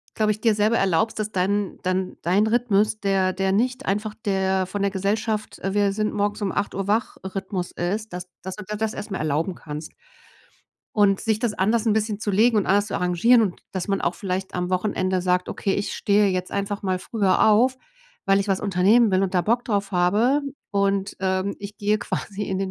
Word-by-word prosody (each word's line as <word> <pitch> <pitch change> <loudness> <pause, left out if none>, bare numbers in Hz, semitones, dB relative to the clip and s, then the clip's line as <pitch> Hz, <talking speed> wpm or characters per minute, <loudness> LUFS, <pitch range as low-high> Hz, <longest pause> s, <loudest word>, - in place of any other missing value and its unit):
glaube 215 -1 +2
ich, 215 - -4
dir 225 -3 +3
selber 215 +2 +2
erlaubst, 195 +4 +1
dass 215 0 -2
dein 195 +2 0
dein 185 0 -1
dein 195 +6 +3
Rhythmus, 215 -2 +2
der 195 -2 +1
der 190 +1 0
nicht 250 +6 0
einfach 210 +2 -2
der 190 -1 +1
von 200 +2 -4
der 200 - +2
Gesellschaft, 210 +3 -2
äh, 195 +1 -3
Wir-sind-morgens-um-8:00- 205 -1 -1
wach-Rhythmus 190 -4 -2
ist, 200 +4 -3
dass 180 0 -6
dass 190 0 -6
du 210 - -8
dir 210 +2 -4
das 220 0 -1
erst 210 0 -7
mal 190 - -3
erlauben 155 +4 -1
kannst. 155 -2 -8 1.0
Und 200 -2 +3
sich 220 -2 0
das 235 -1 0
anders 215 +3 +1
'n 220 - +4
bisschen 215 -1 -1
zu 210 - -1
legen 220 +3 +4
und 205 - +2
anders 200 +1 +3
zu 200 - -5
arrangieren 180 +7 +4
und 190 -5 -2
dass 185 -2 -3
man 195 -1 0
auch 175 - 0
vielleicht 190 -1 -4
am 180 0 -2
Wochenende 185 -1 0
sagt: 180 0 0
„Okay, 195 - -1
ich 200 - -2
stehe 205 0 +2
jetzt 185 -1 -2
einfach 200 +1 -3
mal 185 -1 0
früher 200 0 +2
auf, 250 +5 +4 0.5
weil 195 0 +3
ich 200 - -3
was 195 - +1
unternehmen 205 +4 +4
will 190 +1 +2
und 190 -1 -1
da 180 - +3
Bock 235 +5 +1
drauf 200 -2 -1
habe 210 +10 +3 0.3
und, 200 -1 0
ähm, 190 +1 0
ich 205 0 -8
gehe 210 +1 +1
quasi 205 +1 -4
in 190 -1 -2
den 195 -1 -2
200 Hz, 200 wpm, -23 LUFS, 190-215 Hz, 1.0 s, n